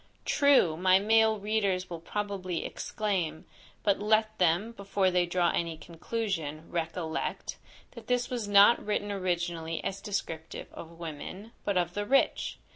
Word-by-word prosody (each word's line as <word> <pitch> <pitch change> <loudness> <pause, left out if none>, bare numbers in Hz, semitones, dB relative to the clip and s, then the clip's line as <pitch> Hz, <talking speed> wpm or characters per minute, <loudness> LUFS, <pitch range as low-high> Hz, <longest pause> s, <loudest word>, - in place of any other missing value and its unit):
True! 280 - +4
my 185 +1 +5
male 220 +2 +4
readers 200 -3 0
will 170 -2 -6
probably 190 -1 -3
exclaim; 185 -7 -2 0.4
but 200 -2 +2
let 215 +1 +2
them, 180 +5 +2
before 200 -3 0
they 180 -1 +2
draw 175 0 +2
any 165 -2 -2
conclusion, 165 -3 -4
recollect, 165 -1 -3 0.3
that 235 -3 -12
this 245 -1 +1
was 240 -5 -3
not 205 +3 +6
written 205 -1 -1
originally 175 -4 -2
as 195 0 -3
descriptive 165 -6 -5
of 165 0 -10
women, 170 +6 -7
but 200 -2 0
of 175 -1 0
the 205 +1 -3
rich. 275 +1 +2
190 Hz, 140 wpm, -29 LUFS, 170-210 Hz, 0.4 s, not